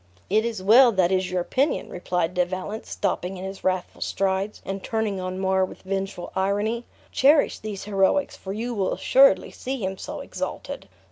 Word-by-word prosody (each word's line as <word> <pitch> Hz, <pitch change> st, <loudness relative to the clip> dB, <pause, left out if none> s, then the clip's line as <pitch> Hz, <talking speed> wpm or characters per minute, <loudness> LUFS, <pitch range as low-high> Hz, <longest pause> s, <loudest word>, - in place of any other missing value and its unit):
"It 215 Hz, +2 st, +3 dB
is 225 Hz, -5 st, -3 dB
well 235 Hz, +5 st, +7 dB
that 185 Hz, -2 st, +3 dB
is 185 Hz, -1 st, +1 dB
your 180 Hz, 0 st, 0 dB
opinion," 270 Hz, -, 0 dB
replied 180 Hz, -1 st, -1 dB
De 180 Hz, 0 st, +3 dB
Valence, 185 Hz, +4 st, -5 dB
stopping 185 Hz, +2 st, -2 dB
in 180 Hz, -, -7 dB
his 195 Hz, 0 st, -7 dB
wrathful 185 Hz, -1 st, -1 dB
strides, 195 Hz, +1 st, -1 dB
and 195 Hz, 0 st, -4 dB
turning 220 Hz, -4 st, -1 dB
on 185 Hz, 0 st, -4 dB
Mar 190 Hz, 0 st, +2 dB
with 185 Hz, -, -6 dB
vengeful 195 Hz, -2 st, -4 dB
irony; 205 Hz, +5 st, 0 dB, 0.3 s
"cherish 285 Hz, +2 st, +4 dB
these 210 Hz, -3 st, -6 dB
heroics, 205 Hz, +7 st, +1 dB
for 190 Hz, -, -7 dB
you 230 Hz, +4 st, -3 dB
will 195 Hz, -4 st, 0 dB
assuredly 265 Hz, -8 st, +4 dB
see 265 Hz, +2 st, -4 dB
him 190 Hz, 0 st, -4 dB
so -, -, -6 dB
exalted. -, -, -6 dB
195 Hz, 180 wpm, -25 LUFS, 185-220 Hz, 0.3 s, well